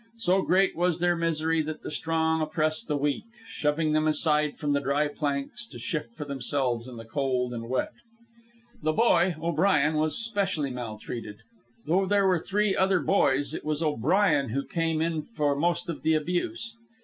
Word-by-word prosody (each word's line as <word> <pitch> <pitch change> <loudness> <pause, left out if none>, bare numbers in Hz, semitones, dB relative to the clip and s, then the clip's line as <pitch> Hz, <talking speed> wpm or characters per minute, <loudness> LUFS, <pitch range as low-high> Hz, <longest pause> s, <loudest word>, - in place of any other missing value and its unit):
So 190 -3 +2
great 190 +1 +2
was 175 -1 +1
their 175 0 +2
misery 165 -1 0
that 155 0 -6
the - - -5
strong 160 +1 0
oppressed 155 +5 -1
the 150 - 0
weak, 145 +4 -1 0.2
shoving 155 -4 0
them 155 0 +2
aside 150 -1 +2
from 145 -1 -1
the 140 - +2
dry 140 +2 +1
planks 145 +8 -3
to - - -10
shift 150 -8 -4
for 150 - -6
themselves 130 -3 -2
in 125 -2 -9
the 115 - -9
cold 125 +1 -1
and 115 0 -6
wet. 130 - -1 0.9
The 155 - +1
boy, 185 -4 +3
O'Brien, 160 -2 +2
was 155 0 +2
specially 200 - 0
maltreated. 115 -3 -6 0.5
Though 185 +5 +2
there 200 0 +3
were 185 -3 +3
three 205 +3 0
other 190 -1 +3
boys, 145 -4 +2
it - - -5
was 155 +1 -1
O'Brien 150 - +2
who 140 +5 -2
came 165 -2 0
in 165 -1 -1
for 150 -8 -1
most 170 +3 0
of 170 - -5
the 160 0 +2
abuse. 220 - -2
155 Hz, 175 wpm, -27 LUFS, 145-175 Hz, 0.9 s, boy